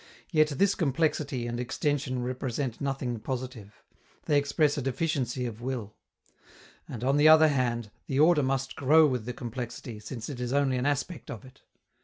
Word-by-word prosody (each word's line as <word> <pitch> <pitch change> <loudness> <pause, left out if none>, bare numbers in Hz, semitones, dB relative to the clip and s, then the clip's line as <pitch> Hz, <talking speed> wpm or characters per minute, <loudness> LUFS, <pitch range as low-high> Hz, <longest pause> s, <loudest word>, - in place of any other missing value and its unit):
Yet 155 -3 +4
this 190 +7 +2
complexity 145 -4 0
and 120 0 -3
extension 130 0 -1
represent 130 0 -3
nothing 135 -4 -2
positive; 125 -3 -6 0.4
they 150 - +2
express 145 +1 +1
a 145 - -2
deficiency 135 -2 -1
of 115 -1 -6
will. 120 -5 -4 1.0
And, 120 -1 -6
on 135 +2 +2
the 150 +1 +6
other 155 0 +8
hand, 120 -5 -1 0.2
the 135 - -1
order 155 0 +5
must 135 0 -1
grow 155 +4 +5
with 125 -6 -1
the 125 - -4
complexity, 120 -2 -6
since 110 +1 -7
it 135 -4 -6
is 125 +1 -2
only 140 -2 +2
an 125 +3 0
aspect 145 +3 -2
of 115 - -7
it. 130 +1 -17
130 Hz, 170 wpm, -28 LUFS, 120-145 Hz, 1.0 s, other